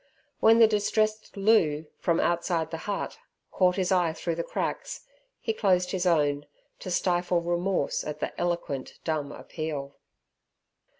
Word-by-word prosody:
When 225 +1 +6
the 230 - +8
distressed 215 0 0
Loo, 175 -8 +3
from 170 -1 +1
outside 170 -1 0
the 165 - -3
hut, 200 - -3 0.3
caught 180 -1 +3
his 190 -1 0
eye 175 -3 +3
through 170 +1 -3
the 170 +1 -2
cracks, - - -4 0.3
he 450 - -1
closed 185 - +2
his 185 -1 0
own, 145 -3 +2 0.3
to - - -6
stifle 175 0 +1
remorse 175 -1 0
at 150 0 -5
the - - -3
eloquent 170 -6 -2
dumb 155 -3 -2
appeal. 145 -3 -5
175 Hz, 140 wpm, -27 LUFS, 160-195 Hz, 0.3 s, the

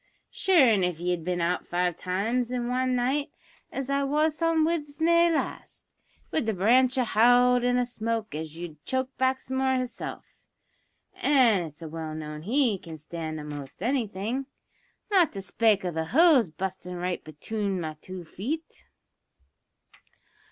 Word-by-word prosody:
Sure, 360 -8 +4 0.2
if 180 -3 0
ye 180 +1 -1
had 175 -2 -2
bin 175 0 -1
out 175 +1 -1
five 175 -1 0
times 220 +8 -1
in 245 -1 -2
wan 255 +1 0
night 265 +4 0 0.4
as 270 -1 -4
I 275 0 +1
wos 305 +3 +1
on 330 -1 +3
Widsenday 330 +2 +2
last, 320 - -4 0.4
wid 310 - 0
the 220 - 0
branch 250 +7 +4
to 255 - +2
howld 245 +2 +4
in 245 0 +2
a 250 - +2
smoke 230 -2 -3
as 155 +1 -6
'ud 160 -3 -8
choke 260 0 -2
Baxmore 260 0 +1
hisself 255 -1 -6 0.7
(an' 235 -11 +3
it's 155 +1 -11
well 160 -1 -5
known 150 -1 -6
he 230 - +1
can 165 -2 -9
stand 155 0 -6
a'most 145 +2 -8
anything), 235 0 -1 0.6
not 365 -5 +4
to 195 - -5
spake 210 -1 +2
o' 180 - -1
the 160 0 -2
hose 280 - +5
bu'stin' 180 +2 -5
right 180 0 -3
betune 195 +6 -3
me 160 -2 -4
two 185 -2 -8
feet." 275 - -6
225 Hz, 150 wpm, -27 LUFS, 175-260 Hz, 0.7 s, hose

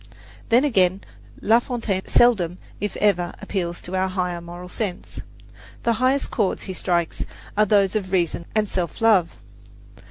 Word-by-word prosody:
Then, 240 +3 +5
again, 190 -7 +2 0.4
La 225 +2 +5
Fontaine 230 -6 -3
seldom, 185 -8 +3 0.2
if 205 -1 -3
ever, 180 -4 +1
appeals 175 -3 -3
to 180 - -6
our 185 0 +1
highest 180 -2 -2
moral 175 +1 -8
sense. 190 0 -5 0.6
The 235 - +2
highest 265 +2 +2
chords 210 -6 0
he 190 - -5
strikes 175 -2 -1 0.3
are 210 0 +3
those 200 -1 +3
of 190 -4 -2
reason 170 -2 0
and 215 -1 +2
self 175 -5 -3
love. 210 -7 +4
190 Hz, 150 wpm, -23 LUFS, 180-215 Hz, 0.6 s, Then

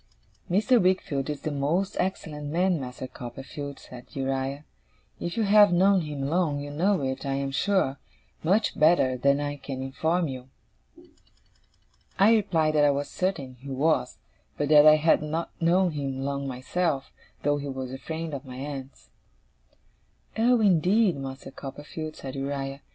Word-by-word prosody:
'Mr. 220 +6 +3
Wickfield 155 -7 0
is 145 -2 -5
a 155 - -1
most 150 +7 0
excellent 150 -6 -3
man, 175 +2 +1
Master 125 0 -6
Copperfield,' 135 +3 -8
said 125 -1 -12
Uriah. 135 +1 -2 0.5
'If 170 - -4
you 225 - +2
have 205 -1 +6
known 190 +2 +4
him 150 -3 -5
long, 160 -2 +1
you 145 0 -6
know 180 +3 +1
it, 130 0 -3
I 135 -1 -1
am 140 0 -2
sure, 150 -2 +1 0.4
much 200 +7 +1
better 155 -5 +4
than 140 +3 +2
I 145 0 -3
can 135 -1 -6
inform 160 +6 0
you.' 130 -1 -7 1.7
I 205 +4 +6
replied 165 -8 +2
that 150 -1 +4
I 145 - +6
was 140 0 -1
certain 145 -9 -2
he 140 +2 -10
was; 135 -1 0 0.4
but 145 0 -1
that 150 0 +8
I 155 - +9
had 155 0 +3
not 155 +2 -3
known 175 +2 +3
him 135 -3 -3
long 140 0 -2
myself, 135 +3 -2 0.3
though 145 0 +2
he 145 0 -5
was 130 -1 -5
a 135 - -6
friend 160 +1 -5
of 140 -1 -5
my 130 -2 -10
aunt's. 135 0 -8 1.2
'Oh, 235 +1 +3
indeed, 190 +1 +3
Master 135 0 -7
Copperfield,' 150 +3 -7
said 135 -1 -7
Uriah. 135 0 -4
145 Hz, 160 wpm, -26 LUFS, 135-175 Hz, 1.7 s, I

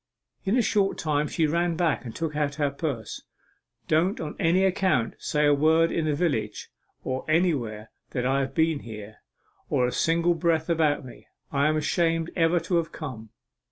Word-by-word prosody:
In 200 +6 +2
a 245 - +3
short 200 -3 +1
time 150 -1 0
she 160 - 0
ran 170 +2 +1
back 165 -2 0
and 115 - -7
took 160 -2 -3
out 145 -1 -1
her 145 -2 0
purse. 140 -7 -4 0.7
"Don't 170 +6 +2
on 150 -2 -5
any 175 +3 +3
account 185 -11 +1
say 150 0 0
a 145 - +5
word 160 +3 +3
in 165 - -1
the 150 -2 +1
village 125 -11 -2 0.3
or 130 0 -3
anywhere 130 -11 0 0.2
that 125 -1 -2
I 135 +1 +2
have 135 0 -3
been 160 -2 +2
here, 110 -3 -9 0.5
or 125 - +2
a 125 - -1
single 170 +4 +2
breath 165 -1 0
about 155 -4 +1
me 125 - -13 0.2
I'm 150 +2 +2
ashamed 165 +1 0
ever 170 0 +3
to 175 +1 0
have 165 -1 -1
come." 120 -9 -7
155 Hz, 180 wpm, -26 LUFS, 135-165 Hz, 0.7 s, a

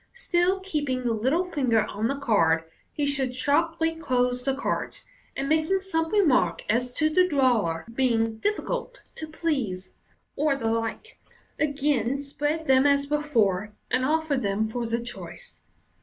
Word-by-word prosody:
Still 370 -5 +1
keeping 290 -9 -2
the 240 -2 +1
little 265 +11 +1
finger 255 -10 +1
on 215 +1 -2
the 275 - -1
card, 170 -12 +2 0.3
he 295 - -1
should 270 -3 -1
sharply 325 +4 +1
close 250 -5 0
the 270 +1 0
cards, 280 - -3 0.3
and 275 - -2
making 315 +5 +2
some 325 -4 -1
remark 255 - +3
as 245 +3 0
to 310 - +2
the 365 +4 +3
drawer 240 - +1
being 225 -3 +1
"difficult - - -3
to 315 - -7
please," 270 - -3 0.4
or 295 -1 +2
the 225 -4 -1
like, 230 - -4 0.4
again 280 -4 +1
spread 295 +3 -3
them 265 0 +5
as 280 0 +3
before, 220 -10 0 0.2
and 255 - +2
offer 310 +1 +1
them 205 -3 0
for 235 +2 -3
the 230 +1 -1
choice. 365 - -8
275 Hz, 150 wpm, -26 LUFS, 230-315 Hz, 0.4 s, them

